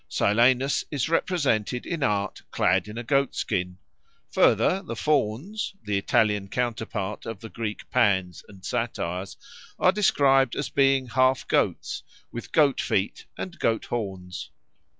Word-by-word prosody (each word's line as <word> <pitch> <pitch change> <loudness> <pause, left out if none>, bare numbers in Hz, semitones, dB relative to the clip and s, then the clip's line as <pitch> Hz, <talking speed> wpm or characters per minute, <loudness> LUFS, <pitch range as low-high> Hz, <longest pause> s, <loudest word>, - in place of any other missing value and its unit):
Silenus 125 +6 +3
is 145 -1 -1
represented 135 - 0
in 165 -3 -3
art 105 -4 0
clad 95 +1 +2
in 105 +2 -8
a 120 - -4
goatskin. 115 -9 0 0.5
Further, 190 - +3
the - - -6
Fauns, 155 - -1
the 105 - -1
Italian 105 0 +2
counterpart 110 -3 -3
of 115 -3 -5
the 115 - -9
Greek 105 -2 -5
Pans 95 -5 +1
and 95 -2 -14
Satyrs, 100 -6 -3 0.4
are 185 - +4
described 135 - +3
as 145 - -2
being 135 -1 +3
half 130 +1 +2
goats, - - 0 0.3
with 120 - -7
goat 145 -4 +3
feet 95 +1 -1
and 180 -2 -6
goat 115 -1 +1
horns. 95 -6 -5
115 Hz, 130 wpm, -26 LUFS, 100-135 Hz, 0.5 s, are